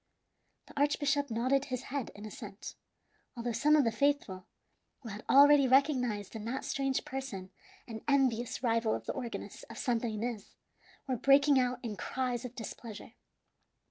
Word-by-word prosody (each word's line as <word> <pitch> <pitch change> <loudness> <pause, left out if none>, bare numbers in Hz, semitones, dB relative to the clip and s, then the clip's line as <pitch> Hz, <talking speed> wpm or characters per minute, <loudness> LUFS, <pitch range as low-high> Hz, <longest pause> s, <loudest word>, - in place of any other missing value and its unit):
The - - -15
archbishop 285 -1 +1
nodded 255 +5 +1
his 255 -3 -4
head 280 -4 -2
in 205 +1 -9
assent, 210 -1 -8 0.6
although 235 0 -2
some 290 +7 +4
of 300 - +5
the 230 - +1
faithful, 280 -10 0 0.5
who 235 - -8
had 210 +2 -7
already 285 0 +7
recognized 250 -7 +2
in 220 - -5
that 255 +4 -3
strange 270 -1 -1
person 215 -9 -6 0.4
an 220 -2 -7
envious 260 -4 +1
rival 230 -2 +2
of - - -7
the - - -2
organist 245 -4 -6
of - - -9
Santa 240 -2 0
Ines, 220 -1 -4 0.5
were 260 -2 -1
breaking 275 +2 +5
out 250 -1 0
in 215 -4 -4
cries 250 -2 -2
of 250 0 -8
displeasure. 225 -2 -8
250 Hz, 155 wpm, -32 LUFS, 225-275 Hz, 0.6 s, already